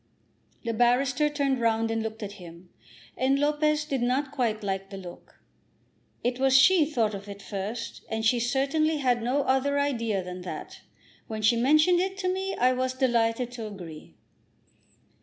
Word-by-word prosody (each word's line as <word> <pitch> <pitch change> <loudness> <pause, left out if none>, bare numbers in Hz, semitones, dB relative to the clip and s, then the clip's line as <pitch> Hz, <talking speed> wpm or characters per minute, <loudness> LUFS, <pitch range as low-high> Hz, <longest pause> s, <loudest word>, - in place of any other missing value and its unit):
The 230 -1 -2
barrister 250 +5 +2
turned 280 -3 0
round 225 -1 +1
and 225 0 -1
looked 220 0 -5
at 205 - -5
him, 170 +1 -12 0.5
and 265 +2 +2
Lopez 300 +1 +1
did 275 -4 -2
not 260 +3 0
quite 230 -6 -1
like 195 -1 -3
the 195 - -8
look. 180 -2 -12 0.8
"It 245 +1 -1
was 265 0 +5
she 330 +2 +6
thought 230 -8 0
of 200 +1 -7
it 200 0 -8
first, 210 +4 -5
and 220 0 -2
she 240 +2 +3
certainly 280 +6 +1
had 250 -4 +1
no 260 +5 0
other 270 +2 +1
idea 230 -9 0
than 180 0 -7
that. 180 - -8 0.5
When 215 -1 -5
she 225 +3 +5
mentioned 305 +8 +4
it 380 +1 -1
to 370 -2 0
me, 385 +1 -3
I 255 +1 +3
was 255 0 -1
delighted 240 -2 +1
to 230 -3 -6
agree." 165 - -10
245 Hz, 170 wpm, -27 LUFS, 220-280 Hz, 0.8 s, she